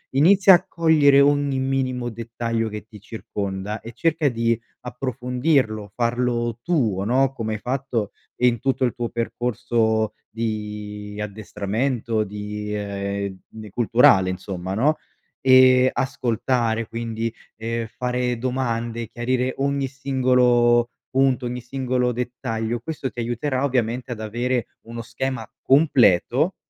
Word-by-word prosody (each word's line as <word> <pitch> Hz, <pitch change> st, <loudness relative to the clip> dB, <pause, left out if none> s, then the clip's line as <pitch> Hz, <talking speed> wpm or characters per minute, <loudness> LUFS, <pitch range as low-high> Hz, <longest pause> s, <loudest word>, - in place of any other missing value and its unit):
Inizia 190 Hz, +6 st, +7 dB
a -, -, -1 dB
cogliere 155 Hz, -4 st, +4 dB
ogni 145 Hz, -1 st, +2 dB
minimo 130 Hz, -2 st, -1 dB
dettaglio 115 Hz, 0 st, -3 dB
che 105 Hz, 0 st, -7 dB
ti 105 Hz, -2 st, -13 dB
circonda, 100 Hz, -1 st, -5 dB
e 115 Hz, -, -9 dB
cerca 155 Hz, +3 st, +1 dB
di 115 Hz, -1 st, 0 dB, 0.2 s
approfondirlo, 125 Hz, -, -1 dB
farlo 120 Hz, -1 st, 0 dB
tuo, 115 Hz, -, +1 dB
no, 130 Hz, +5 st, +2 dB
come 110 Hz, -4 st, -3 dB
hai 110 Hz, -, -4 dB
fatto 125 Hz, -4 st, -2 dB, 0.2 s
in 125 Hz, -2 st, +2 dB
tutto 135 Hz, +2 st, 0 dB
il 125 Hz, -, +2 dB
tuo 120 Hz, -2 st, -3 dB
percorso 115 Hz, -1 st, 0 dB
di 105 Hz, -2 st, -5 dB
addestramento, 110 Hz, +3 st, -2 dB
di, 105 Hz, +1 st, -6 dB
ehm, 100 Hz, -1 st, -3 dB
ne 110 Hz, -1 st, -10 dB
culturale 105 Hz, -4 st, +4 dB
insomma, 95 Hz, 0 st, -5 dB
no? 145 Hz, +8 st, +3 dB, 0.5 s
Ehm, 130 Hz, 0 st, +6 dB
ascoltare, 115 Hz, -2 st, 0 dB
quindi, 115 Hz, -1 st, -3 dB, 0.3 s
ehm, 115 Hz, +1 st, -3 dB
fare 125 Hz, +1 st, -2 dB
domande, 120 Hz, -2 st, -2 dB
chiarire 125 Hz, +1 st, -1 dB
ogni 140 Hz, 0 st, 0 dB
singolo 125 Hz, -3 st, +3 dB, 0.2 s
punto, 135 Hz, -1 st, +2 dB
ogni 125 Hz, 0 st, -4 dB
singolo 125 Hz, 0 st, -1 dB
dettaglio. 120 Hz, -1 st, -3 dB
Questo 140 Hz, 0 st, -4 dB
ti -, -, -9 dB
aiuterà, 125 Hz, +3 st, -1 dB
ovviamente, 125 Hz, -2 st, -1 dB
ad 115 Hz, -, -5 dB
avere 120 Hz, +3 st, -1 dB, 0.2 s
uno 115 Hz, 0 st, -6 dB
schema 130 Hz, +3 st, -4 dB
completo, 135 Hz, -, +3 dB
120 Hz, 120 wpm, -23 LUFS, 110-130 Hz, 0.5 s, Inizia